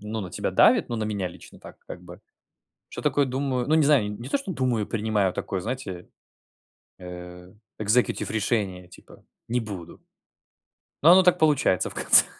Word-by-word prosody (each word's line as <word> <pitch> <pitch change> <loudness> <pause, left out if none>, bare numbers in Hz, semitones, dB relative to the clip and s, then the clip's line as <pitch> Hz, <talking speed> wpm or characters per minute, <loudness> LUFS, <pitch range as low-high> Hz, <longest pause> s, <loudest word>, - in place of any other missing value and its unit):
ну 105 +1 -5
на 90 -3 -7
тебя - - -3
давит, - - +4
ну, 120 - -3
на 110 - -2
меня 100 -3 -3
лично 90 - -15
так - - -14
как 90 - -9
бы. 90 0 -13 0.7
Что - - -8
такое, 145 -2 +1
думаю 130 -1 -2
Ну, 155 - +2
не 160 - +4
знаю, 135 -8 +3
не 120 +5 -8
то, - - 0
что 195 -9 -6
думаю, 125 -7 -1
принимаю 105 -4 -1
такое, 95 - -4
знаете, 105 -6 -6 0.9
э 90 0 -10 0.3
executive 110 +4 +2
решение, 100 -5 -2
типа, 90 - -17 0.2
не 120 +2 0
буду. 100 -7 -8 1.0
Но 165 +4 +7
оно 185 +1 +7
так 180 - +3
получается 145 - +2
в - - -6
конце. - - +6
110 Hz, 175 wpm, -25 LUFS, 95-130 Hz, 1.0 s, Но